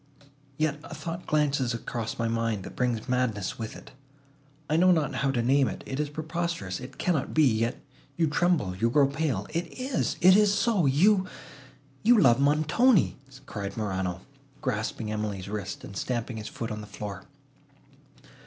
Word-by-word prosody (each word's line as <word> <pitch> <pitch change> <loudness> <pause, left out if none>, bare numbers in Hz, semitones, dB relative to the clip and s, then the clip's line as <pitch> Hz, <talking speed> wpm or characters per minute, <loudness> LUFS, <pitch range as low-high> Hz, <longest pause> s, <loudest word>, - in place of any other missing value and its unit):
Yet 155 -1 0
a - - -8
thought 170 +1 -6
glances 140 -5 +1
across 115 0 -4
my 115 - 0
mind, 115 -3 -1
that - - -9
brings 120 -2 -1
madness 125 -7 -1
with 110 -1 -5
it. - - -12 0.8
I 155 - +1
know 180 +3 +5
not 155 -5 +1
how 135 - +1
to 125 -3 0
name 135 +2 +4
it. - - -5
It 135 - -4
is 150 -1 -1
preposterous—it 155 - -4
cannot 160 -7 -1
be.—Yet 120 -6 +2 0.4
you 165 - +3
tremble—you 145 - +1
grow 140 +3 +5
pale! 140 -7 -1
It 170 +1 -2
is! 260 0 -1
it 185 +1 +7
is 210 -1 +5
so;—you—you—love 150 - +2
Montoni!" 155 - +3 0.3
cried 100 -5 -5
Morano, 95 -4 -2 0.4
grasping 105 0 -2
Emily's 105 -3 -3
wrist, 100 -1 -5
and 100 - -9
stamping 120 +1 -3
his 105 -1 -6
foot 115 +1 -5
on 105 0 -4
the 105 - -9
floor. 100 0 -7
130 Hz, 150 wpm, -27 LUFS, 110-155 Hz, 0.8 s, it